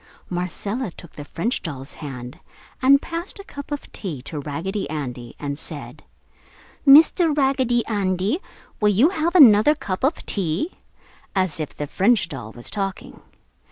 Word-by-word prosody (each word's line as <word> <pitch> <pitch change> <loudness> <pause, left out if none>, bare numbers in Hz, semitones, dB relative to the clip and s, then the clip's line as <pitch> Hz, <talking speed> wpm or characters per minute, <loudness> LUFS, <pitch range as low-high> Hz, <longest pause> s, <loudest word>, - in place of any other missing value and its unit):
Marcella 200 +6 -3
took 175 -1 -13
the 145 - -8
French 210 - -2
doll's 135 -5 -7
hand, 125 -4 -7 0.4
and 275 +2 +6
passed 335 +5 -5
a 395 - -8
cup 285 -6 -9
of 290 - -5
"tea" 170 - -5
to 150 +1 -5
Raggedy 160 +6 -4
Andy, 125 -6 -5
and 140 0 -4
said, - - -8 0.8
"Mr. 310 +2 +7
Raggedy 260 -4 +2
Andy, 200 - 0 0.4
will 210 - +4
you 220 - +5
have 340 -1 -1
another 260 - +8
cup 190 -9 -4
of 285 +5 0
tea?" 195 - -1 0.6
as 185 -5 0
if 155 - -5
the 150 - -3
French 195 +4 +2
doll 125 -8 -7
was 120 +1 -8
talking. 195 -2 -4
195 Hz, 150 wpm, -22 LUFS, -, 0.8 s, another